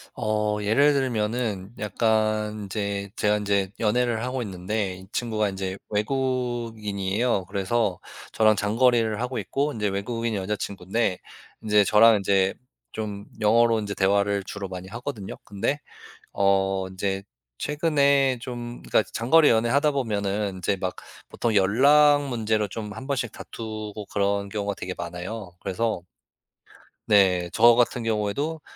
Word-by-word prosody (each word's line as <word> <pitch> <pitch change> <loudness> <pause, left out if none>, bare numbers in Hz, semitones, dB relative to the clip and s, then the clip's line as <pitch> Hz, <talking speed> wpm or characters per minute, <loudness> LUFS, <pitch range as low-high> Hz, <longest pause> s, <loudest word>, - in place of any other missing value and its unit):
어. 105 -1 0
예를 125 +8 +4
들면은 115 -5 -1
약간 110 0 0
인제 100 0 -3
제가 105 0 +2
인제 100 -2 0
연애를 115 +1 +1
하고 125 0 -2
있는데 95 -1 -3
이 95 +1 -13
친구가 110 -3 0
인제 95 0 -4
외국인이에요. 115 -4 -1
그래서 100 +1 -1 0.3
저랑 110 -1 +4
장거리를 115 +1 +2
하고 125 0 -2
있고 145 +2 -1
인제 105 -4 -2
외국인이 115 +3 -2
여자 100 +2 -2
친구인데 95 0 -2 0.4
인제 105 -1 +4
저랑 110 +2 +6
인제 95 -1 +2 0.4
좀 105 -2 -5
영어로 115 +1 +4
인제 100 -1 -4
대화를 100 0 +1
주로 100 0 -6
많이 90 0 -7
하거든요. 115 -2 -6
근데 100 +8 -2 0.5
어 95 -1 +1
인제 95 +1 -3 0.4
최근에 140 -4 +2
좀 120 -1 -6
그러니까 - - +2
장거리 145 +7 +4
연애하다 120 +7 +3
보면은 105 -6 -1
인제 95 +2 -1
막 90 -1 -3 0.3
보통 115 -2 -1
연락 145 +9 +5
문제로 110 -3 0
좀 105 -1 -6
한 130 +4 -8
번씩 125 -5 -1
다투고 110 -2 -7
그런 100 0 0
경우가 100 -1 -3
되게 90 0 -5
많아요. 90 +3 -6
그래서 110 +2 -1 1.1
네. 90 -4 +4
저 120 +1 +6
같은 120 0 +1
경우에도 115 +9 -1
105 Hz, 300 characters per minute, -25 LUFS, 100-120 Hz, 1.1 s, 저랑